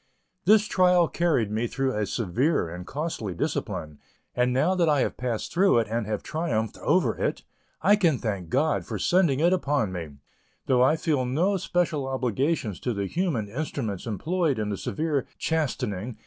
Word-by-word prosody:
This 210 +2 +6
trial 180 -3 +4
carried 155 -13 +1
me 110 +3 0
through 135 +1 -1
a 105 -1 -1
severe 115 - 0
and 90 +2 -8
costly 140 - -4
discipline, 75 -2 -3 0.4
and 125 0 +2
now 135 +9 +2
that 175 -3 +2
I 145 -3 +3
have - - -1
passed 120 -3 -3
through 190 -4 +4
it 115 - +2
and 115 -1 -2
have 105 -2 -3
triumphed 115 -10 -2
over - - +2
it, - - -1 0.4
I 205 +4 +6
can 170 -9 +2
thank 100 -8 -3
God 150 +4 +1
for - - -5
sending 170 -7 +2
it 175 +3 +4
upon 145 - 0
me, 85 -5 -6 0.5
though 125 -2 +3
I 130 +5 +5
feel 155 -4 0
no 160 +11 +1
special 165 -6 -1
obligations 130 - -1
to 120 -3 -2
the 100 0 -1
human 145 - -1
instruments 115 - -4
employed 155 - 0
in 105 -1 -2
the 100 - -2
severe 155 - -2
chastening. 125 - -2
130 Hz, 175 wpm, -26 LUFS, 110-165 Hz, 0.5 s, This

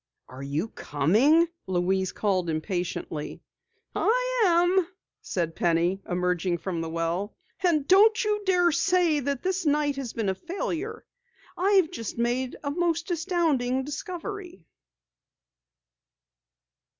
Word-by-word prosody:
"Are 130 +1 -10
you 145 +9 -2
coming?" 225 - +3 0.2
Louise 190 +1 0
called 185 -5 0
impatiently. 160 -2 -3 0.6
"I - - +1
am," 350 +1 +3 0.3
said 170 -3 -3
Penny, 175 +3 +1
emerging 180 0 0
from 170 -2 -4
the 165 - -4
well. 165 +5 -2 0.3
"And 310 -6 +2
don't 430 +4 +5
you 420 0 0
dare 360 -3 +3
say 340 -2 +2
that 280 -1 -3
this 375 0 -1
night 295 -2 +1
has 260 -4 -5
been 220 -4 -1
a - - +1
failure. 370 - -4 0.5
I've 380 -3 +3
just 230 - -6
made 245 +2 -1
a 285 - -2
most 340 +2 -1
astounding 315 -7 0
discovery!" 360 +5 -6
285 Hz, 115 wpm, -26 LUFS, -, 0.6 s, don't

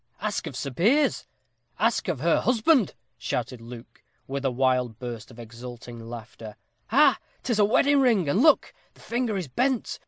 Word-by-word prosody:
"Ask - - -3
of - - -7
Sir 140 - -4
Piers! 240 - +2 0.5
ask - - +1
of - - -2
her - - +3
husband!" 250 - +2 0.2
shouted 125 0 -3
Luke, 120 +1 -12 0.2
with 140 0 -4
a 135 - +2
wild 125 -2 0
burst 120 -3 -7
of 120 - -15
exulting 120 +1 -10
laughter. 115 -2 -9 0.3
"Ha! 230 - -2
ha! 300 - +8
ha! - - -9 0.2
'tis 235 -4 0
a 205 - +6
wedding 280 +7 +3
ring! 230 - +3
And 165 +11 +2
look! 310 0 +4 0.2
the - - -21
finger 235 -3 -2
is 180 -5 -4
bent. 250 - -1
140 Hz, 180 wpm, -26 LUFS, -, 0.5 s, ha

